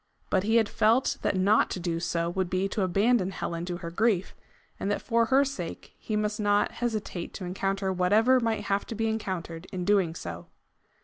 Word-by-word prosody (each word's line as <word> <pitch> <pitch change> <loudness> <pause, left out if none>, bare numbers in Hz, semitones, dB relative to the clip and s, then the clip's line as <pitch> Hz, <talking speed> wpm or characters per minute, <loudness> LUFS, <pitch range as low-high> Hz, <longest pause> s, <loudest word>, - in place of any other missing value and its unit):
But 190 - +3
he 220 +4 +1
had 225 -2 +4
felt 225 +6 +2
that - - 0
not 200 +4 +4
to - - -4
do 170 -1 -2
so 170 0 -1
would 185 0 -1
be 185 +2 0
to 205 - -2
abandon 195 +2 +2
Helen 170 -2 -4
to 175 -1 -4
her 170 -2 -7
grief, 200 0 +1 0.5
and 195 - -2
that 205 - 0
for 230 -1 +2
her 270 +4 +4
sake 190 -12 -6
he 215 - -3
must 210 0 -1
not 205 -1 +2
hesitate 215 -7 -4
to 185 - -5
encounter 195 +1 -1
whatever 215 +8 +4
might 225 -2 -1
have 200 0 -1
to 230 - -5
be 225 +1 0
encountered 185 -6 -4
in 180 -2 -3
doing 190 -5 +2
so. 85 - -7
195 Hz, 200 wpm, -28 LUFS, 180-220 Hz, 0.5 s, had